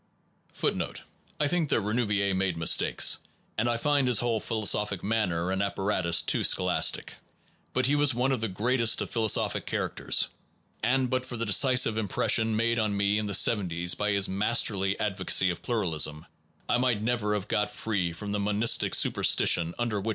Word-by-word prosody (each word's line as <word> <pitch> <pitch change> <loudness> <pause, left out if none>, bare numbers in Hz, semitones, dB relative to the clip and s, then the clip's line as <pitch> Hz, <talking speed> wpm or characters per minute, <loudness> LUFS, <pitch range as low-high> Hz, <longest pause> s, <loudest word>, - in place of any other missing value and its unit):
1 - - 0
1 - - -4 0.5
I 150 - +2
think 165 -1 -1
that - - +2
Renouvier 105 -2 0
made 95 -2 -1
mistakes, 80 - +2 0.4
and 115 +2 0
I 120 - 0
find 140 +1 +1
his 125 -4 +3
whole 120 -2 0
philo 110 0 -4
sophic 105 -2 0
manner 95 -5 -1
and 95 +1 -1
apparatus 95 -4 0
too - - 0
scholastic. - - +1 0.6
But 130 0 0
he 140 - +2
was 145 -4 +2
one 125 +2 0
of 130 -4 -1
the 115 - 0
greatest 115 +4 +1
of - - -10
philosophic 110 -3 0
characters, - - 0 0.5
and 130 +3 +1
but 130 +1 -1
for 130 -2 -7
the 115 - -2
decisive 125 +1 +3
impression 110 +2 0
made 115 +2 0
on 105 -2 -1
me 100 +1 +1
in 105 - -3
the 100 - -1
seventies 90 -5 +1
by 105 - -2
his 100 -1 +1
masterly 100 -1 0
advocacy 95 -2 +1
of 85 - -7
pluralism; 80 -9 -2 0.4
I 120 - +1
might 125 -4 +1
never 110 -3 -1
have 105 -1 -4
got 105 0 0
free 100 -6 -2
from 100 +5 -7
the 105 - -2
monistic 105 +3 +1
superstition 85 0 +2
under 115 -4 -2
which. 110 - -4
105 Hz, 180 wpm, -27 LUFS, 95-120 Hz, 0.6 s, his